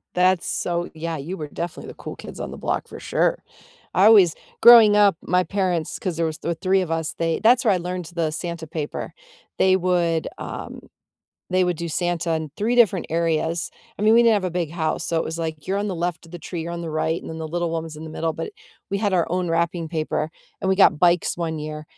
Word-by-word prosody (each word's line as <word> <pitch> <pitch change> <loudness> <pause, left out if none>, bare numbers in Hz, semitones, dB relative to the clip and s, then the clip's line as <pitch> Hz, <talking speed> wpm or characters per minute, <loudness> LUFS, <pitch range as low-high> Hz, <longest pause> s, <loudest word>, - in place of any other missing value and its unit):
That's 180 0 +3
so 175 0 -2
Yeah, 165 0 -4
you 165 +7 -5
were 150 - -5
definitely 170 +3 -6
the - - -8
cool - - -8
kids - - -10
on - - -5
the - - -8
block, - - -2
for - - -10
sure. - - 0 0.5
I 190 - +4
always 200 -7 +7 0.3
Growing 230 -3 +9
up, 200 -4 +5
my 180 +1 +1
parents 180 -5 -1
'cause 180 -4 -3
there 165 - +1
was 160 -1 -3
th 170 -1 -3
three 190 +1 +3
of 170 -3 -4
us, 160 -1 -1
they 165 -1 -1
that's 245 +3 +5
where 210 - +5
I 185 - +1
learned 180 0 -4
the 165 -2 0
Santa 170 0 -5
paper. 155 -2 -5 0.4
They 190 0 +4
would, 175 -3 +1
um - - -7 0.7
They 185 0 +3
would 180 -1 0
do 170 - -4
Santa 175 +1 -1
in 160 -2 -2
3 225 +4 0
different 200 -7 +4
areas. 165 0 0 0.3
I 205 - -4
mean, 220 +1 +5
we 235 - +7
didn't 230 -1 +5
have 200 -3 0
a 185 - -1
big 170 -3 -2
house, 160 -1 -2
so, 165 - 0
it - - -1
was 160 +1 -5
like 160 -2 -4
you're 195 - 0
on 205 - -1
the 190 - -2
left 175 0 -3
of 165 - -17
the 175 - -6
tree, 170 0 -5
you're 170 +1 -5
on 170 - -4
the 170 - -5
right, 160 +1 -1
and - - -10
then 160 - -6
the 160 - -4
little 175 +1 -1
one 165 0 -2
was 160 -1 -8
in 155 - -8
the 160 - -8
middle, 160 +1 -2
but 425 - -6 0.4
we 200 - 0
had 205 -1 0
our 175 -3 +2
own 180 0 -1
wrapping 170 0 0
paper, 155 -1 -2 0.3
and 190 - 0
we 190 - +2
got 185 -5 +5
bikes 175 0 +3
one 165 -2 -3
year, 150 0 -6
170 Hz, 250 wpm, -23 LUFS, 160-185 Hz, 0.7 s, Growing